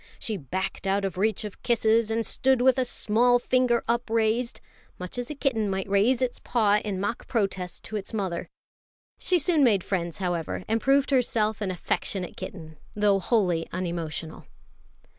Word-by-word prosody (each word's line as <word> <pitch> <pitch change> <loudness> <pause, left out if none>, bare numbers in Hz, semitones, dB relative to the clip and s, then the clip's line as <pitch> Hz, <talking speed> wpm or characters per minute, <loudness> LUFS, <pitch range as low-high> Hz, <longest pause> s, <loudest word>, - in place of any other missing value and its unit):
She 220 - -3
backed 190 +4 -4
out 195 +1 +1
of 190 - -3
reach 215 +1 +1
of 210 -2 -8
kisses, 225 -1 +2
and 225 0 0
stood 265 -1 +2
with 260 +1 +4
a 255 - +2
small 245 +1 +2
finger 245 -1 +2
upraised; 230 0 0 0.4
much 180 +6 -6
as 245 - -4
a 300 - -5
kitten 230 -7 0
might 190 0 -2
raise 220 +6 +3
its 250 - -2
paw 210 -4 +2
in 200 -3 -3
mock 205 +5 -3
protest 195 -6 -2
to 215 - -4
its 195 - -7
mother. 190 -6 -3 0.7
She 365 - +3
soon 315 -1 +3
made 205 -8 +4
friends, 170 -4 -2
however, 175 -2 -2
and 225 +1 0
proved 275 +1 +3
herself 220 -5 +1
an 200 - -1
affectionate 185 +1 -2
kitten, 160 -4 -8 0.2
though 205 -2 +3
wholly 180 -5 +1
unemotional. 170 -3 -4
215 Hz, 165 wpm, -26 LUFS, 190-240 Hz, 0.7 s, with